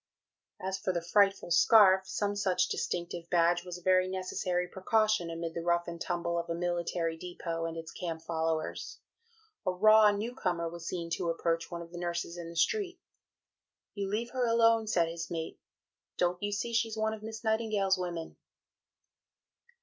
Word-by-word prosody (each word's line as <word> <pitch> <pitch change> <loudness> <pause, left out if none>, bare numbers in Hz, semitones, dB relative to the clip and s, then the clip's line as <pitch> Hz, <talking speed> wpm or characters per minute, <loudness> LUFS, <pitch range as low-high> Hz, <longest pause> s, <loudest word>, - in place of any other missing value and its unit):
" - - -61
As 190 0 -2
for 190 - -1
the 175 - -1
"frightful 195 0 +2
scarf" 190 +1 +6
some 205 0 -1
such 185 -3 +1
distinctive 170 -1 -3
badge 175 0 +3
was 180 -1 -6
a 180 - -15
very 185 0 +4
necessary 185 -1 -2
precaution 215 0 +1
amid 165 0 -4
the 170 - -3
rough 170 0 +1
and 170 -1 -6
tumble 170 -1 -1
of 170 - -5
a 170 - -1
military 170 -1 -1
depot 165 -1 -5
and 165 0 -6
its 165 0 -7
camp 165 -2 -5
followers. 160 -1 -2 0.7
A 185 - +1
raw 215 +3 +6
new 210 +4 -2
comer 175 -8 -1
was 170 0 -7
seen 170 -2 -4
to 170 - -1
approach 165 0 -1
one 170 -1 -5
of 170 - -14
the 175 - -7
nurses 170 -1 -3
in 170 -1 -7
the 170 - -10
street. 370 - 0 0.9
"You 200 -2 -3
leave 230 +4 -2
her 255 -2 0
alone," 230 -1 +4
said 170 -5 +2
his 165 0 -5
mate, 165 -1 -5 0.6
"don't 180 0 +1
you 205 0 -1
see 235 +3 -2
she's 225 -1 0
one 220 0 0
of 220 - -8
Miss 220 +1 -7
Nightingale's 215 -4 +1
women?" 170 -2 -5
180 Hz, 180 wpm, -31 LUFS, 170-205 Hz, 0.9 s, scarf